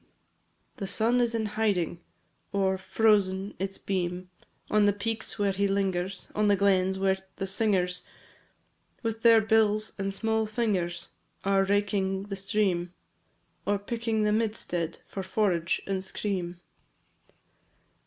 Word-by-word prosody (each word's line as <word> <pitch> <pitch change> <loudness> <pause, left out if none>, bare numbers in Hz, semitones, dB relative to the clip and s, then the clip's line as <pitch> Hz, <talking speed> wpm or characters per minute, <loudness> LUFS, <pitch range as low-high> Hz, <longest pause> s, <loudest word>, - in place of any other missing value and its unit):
VI. - - -35 0.7
The 200 -5 -4
sun 230 +5 +2
is 235 -1 +1
in 220 -1 0
hiding, 205 -6 0 0.5
Or 195 -1 +2
frozen 195 -1 +2
its 195 +1 -3
beam 180 -1 -3 0.4
On 210 -1 +5
the 205 - +4
peaks 220 +3 -3
where 200 -2 +2
he 200 +1 +1
lingers, 195 -1 -1
On 210 0 +2
the 205 - +5
glens, 190 -1 +2
where 190 0 +1 0.2
the 195 - -3
singers, 190 -3 +1 1.0
With 225 -1 -2
their 230 -1 +7
bills 215 -1 +2
and 195 0 -1
small 220 +2 0
fingers 200 -6 -1 0.3
Are 195 0 +3
raking 195 -1 +1
the 200 - -2
stream, 190 -3 0 0.7
Or 205 0 +3
picking 225 +1 -1
the 210 - +2
midstead 210 -7 -1
For 195 - -5
forage 185 -3 0
and 190 -1 -2
scream. 185 -3 -3
200 Hz, 135 wpm, -28 LUFS, 190-215 Hz, 1.0 s, their